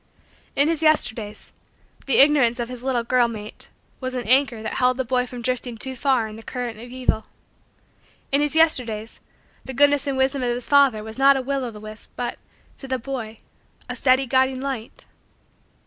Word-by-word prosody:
In 285 +2 +5
his 325 -1 0
Yesterdays, 220 -9 0 0.6
the 275 - +3
ignorance 275 -4 +5
of 235 0 -3
his 250 -1 -8
little 255 -2 -1
girl 245 0 +2
mate 215 -2 -7 0.3
was 255 -1 -4
an 245 -3 -4
anchor 255 -3 +2
that - - -4
held 255 0 +2
the 260 - -1
boy 250 +1 0
from 245 -1 -8
drifting 245 -1 -3
too 260 +3 -4
far 255 -3 +1
in 215 0 -10
the - - -10
current 240 -2 -5
of 240 +2 -10
evil. 250 -3 -1 1.0
In 280 +1 +4
his 295 +1 +2
Yesterdays, 235 -9 +1 0.4
the 265 - -7
goodness 285 +1 +3
and 275 -1 -1
wisdom 265 +1 +1
of 245 - 0
his 240 0 -2
father 275 -7 +4
was 220 +3 -9
not 275 0 +6
a - - -1
will 275 0 -2
o' 245 - -3
the 215 -2 -11
wisp 215 0 -11
but, 240 -1 -4 0.4
to 270 - -9
the 260 0 -1
boy, 235 -3 -6 0.5
a - - -5
steady 260 0 +3
guiding 260 +1 +1
light. 260 -4 -6
255 Hz, 195 wpm, -23 LUFS, 235-270 Hz, 1.0 s, not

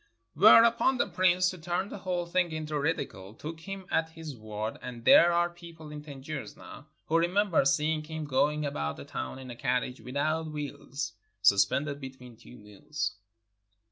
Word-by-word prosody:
Whereupon 230 - +6
the - - +2
Prince, 185 0 +3
to 185 - -10
turn 175 +4 -2
the - - -7
whole 180 -2 -2
thing 175 0 0
into 155 -1 -3
ridicule, 110 -10 -3
took 160 +6 -7
him 195 +2 -7
at 160 0 +1
his 160 -3 -8
word, 110 -1 -5
and 120 -2 -8
there 175 - +8
are 175 0 +3
people 170 -3 -12
in 150 0 -7
Tangier 145 0 -6
now 145 - -12 0.2
who 165 +1 +2
remember 180 0 +2
seeing 155 +3 +1
him 160 0 -5
going 150 +2 +1
about 75 - -3
the - - -9
town - - -5
in 130 -1 -9
a - - -8
carriage 125 +1 -1
without 155 +5 -1
wheels, 145 -4 -5 0.3
suspended 105 +9 +3
between 130 -3 -10
two 120 +2 -15
mules! 105 +5 -4
155 Hz, 170 wpm, -29 LUFS, 130-170 Hz, 0.3 s, there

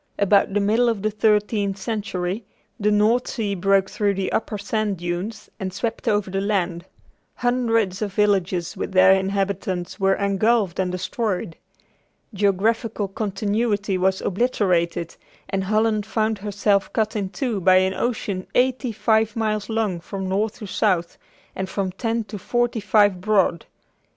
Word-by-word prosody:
About 200 0 +3
the - - +4
middle 220 +4 +3
of 215 -4 -2
the 215 - +1
thirteenth 210 -1 +1
century, 200 -2 -3 0.4
the 210 0 +2
North 215 +4 +3
Sea 210 -4 -2
broke 195 +1 +2
through 200 0 0
the 190 0 -2
upper 215 -1 -1
sand 205 0 -1
dunes 175 +5 -4
and 190 -1 -3
swept 205 +4 -4
over 205 -2 +1
the 195 +1 -1
land. 185 -4 -1 0.5
Hundreds 230 -5 0
of 210 -2 -2
villages 190 -4 +1
with - - -4
their 190 0 +7
inhabitants 195 -1 -2
were 195 0 +3
engulfed 200 -1 +1
and 185 -1 0
destroyed. 185 -2 -2 0.8
Geographical 205 +1 0
continuity 205 0 -1
was 190 +1 +1
obliterated, 180 -6 0 0.3
and 195 -1 -1
Holland 215 +1 +1
found 220 -1 0
herself 200 0 0
cut 215 -1 0
in 200 -3 -2
two 235 -1 -2
by 185 +1 +5
an 185 0 +3
ocean 200 -5 -2
eighty 255 0 +2
five 220 0 +1
miles 215 -2 -1
long 220 -6 -1
from 190 +3 -5
north 205 +3 -1
to 210 - -8
south, 185 -4 0 0.4
and 190 0 -3
from 190 -2 -2
ten 225 +4 -2
to 205 0 -8
forty 240 +3 0
five 205 -2 +3
broad. 190 -5 +1
200 Hz, 150 wpm, -23 LUFS, 190-220 Hz, 0.8 s, their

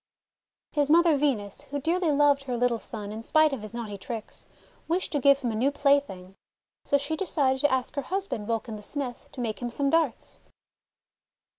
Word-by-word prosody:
His 290 -2 +1
mother 335 0 +5
Venus, 250 -9 -1
who 285 +1 -2
dearly 340 +4 +1
loved 285 -1 +3
her 250 -2 -2
little 240 -1 +1
son 210 -3 -6
in 220 +1 -6
spite 310 +5 +3
of 260 - -4
his 215 - -8
naughty 220 -4 -6
tricks, 225 +2 -7 0.4
wished 350 +3 -1
to 290 - 0
give 280 +1 +5
him 245 -4 -2
a - - -3
new 250 +6 +2
plaything. 280 -10 +1 0.5
So 285 - +3
she 285 +3 -3
decided 280 -7 0
to 290 - +3
ask 260 -1 0
her 280 - -2
husband, 275 - -3
Vulcan 225 -1 -2
the - - -10
Smith, 250 +1 -5
to - - -9
make 220 -2 -3
him 240 - -2
some 275 +3 0
darts. 325 -7 0
275 Hz, 190 wpm, -27 LUFS, 230-290 Hz, 0.5 s, mother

